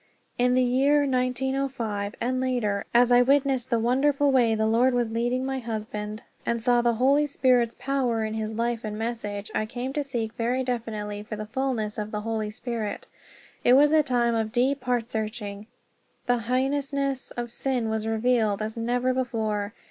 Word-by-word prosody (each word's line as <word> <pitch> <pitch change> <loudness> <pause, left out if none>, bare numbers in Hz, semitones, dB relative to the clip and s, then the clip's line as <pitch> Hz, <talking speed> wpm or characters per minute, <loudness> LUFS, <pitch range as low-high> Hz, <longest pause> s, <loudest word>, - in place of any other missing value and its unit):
In 250 0 +3
the 255 - +4
year 270 +4 +3
1905, 255 -5 -1
and 255 +1 -1
later, 230 -6 0
as 245 +1 +4
I 245 0 +7
witnessed 265 -1 +2
the 235 - +2
wonderful 275 +5 +2
way 240 -4 +3
the 220 0 +1
Lord 240 +3 +3
was 240 -2 0
leading 240 +3 0
my 265 0 -2
husband, 215 -2 -5 0.2
and 235 0 -1
saw 240 +1 +3
the 235 -1 +2
Holy 280 +5 +3
Spirit's 250 -4 +2
power 250 -5 0
in 215 - -3
his 220 0 -3
life 235 0 -1
and 210 -1 -4
message, 215 -3 -4
I 215 - -1
came 250 +4 -4
to 295 - -1
seek 235 -5 -3
very 245 +3 0
definitely 215 -4 -3
for 215 +1 -6
the 215 0 -5
fulness 220 -3 -2
of 210 0 -3
the 210 -1 -3
Holy 220 -1 -2
Spirit. 220 -2 -4 0.6
It 245 - +5
was 290 +3 +6
a 310 0 +6
time 240 -4 +1
of 220 -1 -1
deep 255 +3 +1
heart 245 -2 0
searching. 215 -2 -4 0.6
The 245 -1 +2
heinousness 270 +2 -1
of 240 -1 -3
sin 250 -1 -1
was 220 0 -2
revealed 225 -2 +1
as 220 0 -4
never 245 +2 0
before. 220 -5 -2
240 Hz, 180 wpm, -26 LUFS, 220-260 Hz, 0.6 s, I